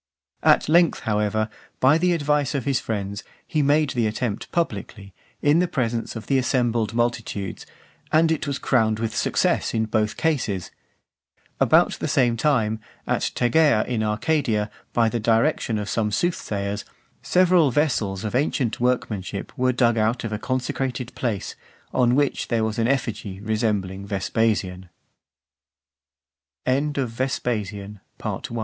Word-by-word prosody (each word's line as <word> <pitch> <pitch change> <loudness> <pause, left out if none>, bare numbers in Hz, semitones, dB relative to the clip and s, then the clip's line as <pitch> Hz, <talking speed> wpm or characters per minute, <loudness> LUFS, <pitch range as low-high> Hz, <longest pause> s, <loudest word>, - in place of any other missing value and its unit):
At - - +4
length, 170 +2 +4
however, 105 0 0 0.3
by 140 +5 +5
the 180 +1 +3
advice 150 -2 +1
of 135 - -2
his 140 -2 +1
friends, 100 -2 -4 0.2
he 155 - 0
made 145 0 +3
the 120 -3 +1
attempt 110 0 -3
publicly, 100 - -3 0.3
in 150 +3 +4
the 180 - +2
presence 120 -7 -2
of 110 - -6
the 135 -1 +2
assembled 120 -3 0
multitudes, 115 -4 -2 0.4
and 160 +1 +4
it 160 -2 -1
was 140 -1 -1
crowned 110 -4 +2
with 110 0 -3
success - - +1
in 110 0 +1
both 105 0 0
cases. 125 - -1 0.9
About - - +4
the - - -2
same 120 -3 +2
time, 110 -4 +1 0.3
at - - 0
Tegea 125 -1 +3
in 120 -3 -1
Arcadia, 110 -1 0 0.2
by 115 -1 +3
the 115 +1 -1
direction 115 +2 +1
(451) 105 - -1
of - - -8
some 105 -2 0
soothsayers, 105 - -2 0.4
several 180 -4 +4
vessels 115 -9 0
of 105 - -3
ancient 130 -3 0
workmanship 110 -6 -2
were 130 -2 +2
dug 120 -2 +2
out 110 +3 +1
of 110 -1 -3
a 105 - -2
consecrated 130 -1 -2
place, 110 -6 -3 0.4
on 125 -1 +3
which 145 0 +1
there 115 -2 +1
was 110 +1 -2
an 115 - +2
effigy 110 -7 -2
resembling 105 -3 -1
Vespasian. 95 -2 -1 1.8
VIII. 120 -7 -2
115 Hz, 140 wpm, -23 LUFS, 105-135 Hz, 1.8 s, by